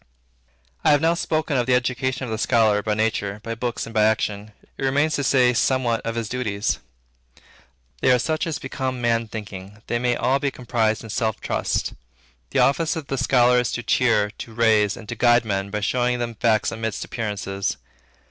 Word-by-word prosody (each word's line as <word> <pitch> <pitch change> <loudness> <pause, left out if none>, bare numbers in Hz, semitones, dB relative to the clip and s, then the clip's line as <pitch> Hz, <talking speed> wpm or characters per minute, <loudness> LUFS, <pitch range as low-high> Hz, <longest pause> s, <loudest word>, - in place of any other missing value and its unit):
I - - +4
have 145 -1 +5
now 165 +1 +3
spoken 155 -4 -1
of 120 0 0
the 125 - +4
education 130 +1 -1
of 115 - -6
the 110 - -2
scholar 110 -5 +3
by 105 0 -1
nature, 105 -2 -1
by 115 - -4
books, 120 +1 -3
and 115 - -10
by 110 - +3
action. 105 -1 -1 0.2
It - - -7
remains 145 +4 +2
to 140 - -1
say 125 -2 +4
somewhat 120 -1 +1
of 115 0 -3
his 115 -2 -2
duties. 105 -4 -2 1.2
They - - +2
are 125 - +5
such 155 +7 -1
as 160 -2 -2
become 130 -3 -4
Man 115 -1 +1
Thinking. 105 -1 -8
They 120 - -1
may 120 0 +1
all 130 +3 +1
be 140 0 0
comprised 115 -4 -1
in 110 - -8
self 110 -1 -1
trust. - - -1 0.6
The - - -3
office 160 +4 +3
of 160 -4 -6
the 135 - -1
scholar 125 -2 +4
is 120 - -1
to 120 - -3
cheer, 115 -5 +2
to 115 - -8
raise, 110 -3 +3
and 110 - -11
to - - -4
guide 120 0 +3
men 100 -2 -2
by 105 +1 -3
showing 125 +3 +1
them 120 -1 -3
facts 110 -1 +1
amidst 110 -1 -4
appearances. 100 -4 -3
120 Hz, 195 wpm, -23 LUFS, 110-130 Hz, 1.2 s, have